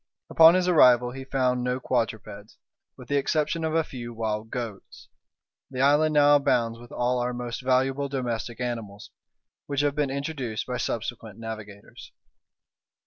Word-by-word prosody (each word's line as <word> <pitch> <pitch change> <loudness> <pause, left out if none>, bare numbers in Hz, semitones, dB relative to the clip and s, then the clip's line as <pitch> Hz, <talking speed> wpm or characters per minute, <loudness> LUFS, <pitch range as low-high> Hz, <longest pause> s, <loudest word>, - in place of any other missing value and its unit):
Upon 165 +1 +8
his 185 -1 +1
arrival 125 -8 +5
he 130 +1 -8
found 125 -2 0
no 125 +1 -1
quadrupeds, 110 -4 -3 0.4
with 125 - -12
the 145 - +1
exception 155 +3 0
of 160 0 -1
a 165 - +3
few 120 -5 -8
wild 110 -1 -3
goats; 115 -5 -7 0.6
the 130 -1 -3
island 150 +2 +3
now 145 0 +6
abounds 115 -4 0
with 120 0 -14
all 125 +1 0
our 125 0 -2
most 120 -2 -5
valuable 130 +2 +1
domestic 120 -3 -4
animals, 115 -5 -5 0.6
which 140 -1 0
have 145 -1 +1
been 145 -1 -1
introduced 135 -5 -4
by 125 -1 -3
subsequent 115 -3 -4
navigators. 110 -3 -9
125 Hz, 150 wpm, -26 LUFS, 115-140 Hz, 0.6 s, Upon